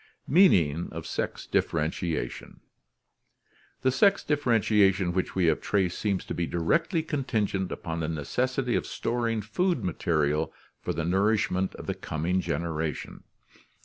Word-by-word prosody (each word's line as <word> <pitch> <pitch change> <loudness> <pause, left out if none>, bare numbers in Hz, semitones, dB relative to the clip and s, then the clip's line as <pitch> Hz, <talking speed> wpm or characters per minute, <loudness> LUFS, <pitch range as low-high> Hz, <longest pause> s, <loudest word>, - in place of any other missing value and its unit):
Meaning 90 - +4
of 80 0 -6
Sex - - -3
Differentiation 80 +1 -2 1.2
The 130 - +4
sex 200 +9 +4
differentiation 105 - +2
which 95 0 -1
we 95 -2 +2
have 80 - +2
traced 95 -4 0
seems 100 -3 -1
to - - -4
be 85 -1 -1
directly 160 - +1
contingent 110 - -1
upon 80 0 -4
the 80 -1 -2
necessity 125 - -1
of - - -1
storing 115 -2 -1
food 165 - 0
ma 90 - 0
terial 75 -1 0 0.3
for - - -2
the 80 +1 -2
nourishment 95 0 +1
of - - -9
the - - -1
coming 85 +5 -1
generation. 80 -2 -3
95 Hz, 135 wpm, -27 LUFS, 80-120 Hz, 1.2 s, Meaning